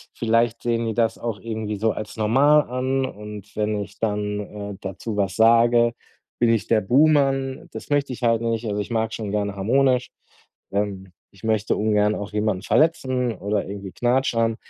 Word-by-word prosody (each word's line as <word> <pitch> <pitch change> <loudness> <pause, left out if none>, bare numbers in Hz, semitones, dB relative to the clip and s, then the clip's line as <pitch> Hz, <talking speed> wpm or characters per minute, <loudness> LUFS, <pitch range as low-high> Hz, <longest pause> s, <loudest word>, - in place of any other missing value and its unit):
Vielleicht 115 0 +1
sehen 115 -1 0
die 110 - -1
das 115 -2 +1
auch 115 -4 -4
irgendwie 110 -1 -4
so 110 +2 +1
als 105 0 -7
normal 135 +8 +4
an 130 +1 0
und 105 -2 -9
wenn 105 -1 -1
ich 100 +1 -10
dann, 105 -1 -1 0.3
äh, 95 - -11
dazu 100 +3 -5
was 95 -2 0
sage, 115 +1 +5 0.5
bin 120 -1 +3
ich 115 -2 +1
der 110 -2 +3
Buhmann. 135 +1 +2
Das - - -9
möchte 145 -2 +1
ich 125 - -9
halt 115 -1 +3
nicht. 115 0 -1
Also, 105 -1 -2
ich - - -7
mag's 110 -1 -1
schon 105 -3 -5
gerne 100 -1 -1
harmonisch. 125 +5 +2 0.6
Ähm, 100 -2 -3 0.2
ich 100 0 -21
möchte 110 -1 +1
ungern 105 0 +2
auch 105 0 -6
jemanden 105 -3 -1
verletzen 130 -6 +1
oder 100 +1 -2
irgendwie 100 -1 -7
knatschern. 120 -2 +1
110 Hz, 175 wpm, -23 LUFS, 105-120 Hz, 0.6 s, sage